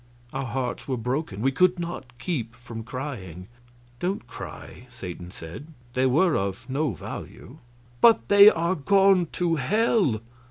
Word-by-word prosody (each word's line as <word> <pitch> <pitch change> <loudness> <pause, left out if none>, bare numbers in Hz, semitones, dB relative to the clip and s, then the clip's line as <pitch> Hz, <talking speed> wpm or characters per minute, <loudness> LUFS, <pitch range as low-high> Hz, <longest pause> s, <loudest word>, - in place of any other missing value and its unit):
Our 135 0 -3
hearts 125 +1 -3
were 130 -2 -1
broken; 125 -3 -3
we 135 - +3
could 180 +6 +3
not 170 -8 -6
keep 125 -5 -3
from 120 -1 -8
crying. 110 - -6 0.5
"Don't 185 -5 -2
cry," 120 +1 -10
Satan 90 -7 -8
said; 90 - -9 0.3
"they 130 +1 +2
were 155 +6 +3
of 100 +4 -2
no 140 -1 0
value." 85 - -9 0.4
"But 230 -1 +6
they 200 +1 +9
are 170 -1 0
gone 190 +2 +4
to 170 -2 +1
hell!" 195 - +2
130 Hz, 145 wpm, -25 LUFS, 115-175 Hz, 0.5 s, they